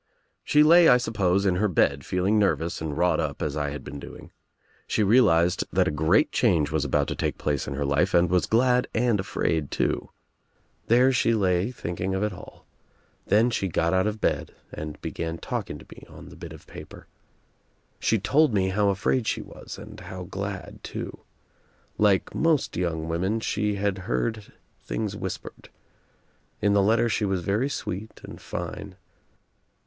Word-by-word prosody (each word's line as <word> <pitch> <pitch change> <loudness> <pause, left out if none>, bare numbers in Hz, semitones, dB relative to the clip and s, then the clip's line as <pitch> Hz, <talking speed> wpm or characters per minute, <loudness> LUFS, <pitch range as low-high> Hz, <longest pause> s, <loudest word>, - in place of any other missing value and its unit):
She 150 0 +4
lay, 170 +2 +7
I 125 - +7
sup 120 -2 -4
pose, 100 -1 +2
in 90 -2 +2
her 105 +3 +2
bed 70 -6 +1
feeling 95 +7 +1
nervous 85 -5 0
and 75 -3 -4
wrought 90 +1 +2
up 75 -4 -2
as 75 -2 -2
I 75 -1 -1
had 70 -1 -7
been 70 +1 -8
doing. - - -11 0.6
She 110 - +1
realized 95 -6 +4
that - - +2
a - - +1
great 75 +2 +2
change 75 -3 +2
was 80 -2 0
about 70 - +1
to - - -2
take - - -2
place 75 -2 -2
in 70 - -4
her 70 +1 -2
life 75 +7 +1
and 85 +1 +5
was 90 +1 +1
glad 125 +2 +3
and 115 -2 +2
afraid 80 -5 -1
too. - - -1 0.8
There 125 +3 +5
she 115 -2 +2
lay 95 0 +1
thinking 95 -5 -4
of 95 - -1
it 105 -2 -1
all. 90 - -13 0.6
Then 110 +5 +4
she 100 - -1
got 85 0 0
out 95 +2 +2
of 105 0 -3
bed - - -1 0.2
and 75 -1 -6
began 80 0 -4
talking - - -4
to - - -14
me - - -15
on - - -12
the - - -13
bit - - -9
of - - -12
paper. - - -11 0.9
She 115 - +2
told 140 +5 +2
me 95 -1 +2
how 100 +1 +2
afraid 105 +5 0
she - - -1
was - - -10
and - - -11
how 95 -1 -8
glad 100 +2 -6
too. - - -6 0.8
Like 100 -3 +3
most 160 -3 +1
young 80 -2 -2
women 95 +7 -1
she 105 -1 -1
had 100 -1 -1
heard 100 - -3 0.3
things 105 -3 -3
whispered. 95 -2 -7 0.9
In 100 -1 +2
the 100 - +4
letter 110 +4 +3
she 110 -1 -1
was 95 -3 -1
very 105 +9 0
sweet 110 -5 -5
and - - -10
fine. - - -6
95 Hz, 180 wpm, -25 LUFS, 85-110 Hz, 0.9 s, lay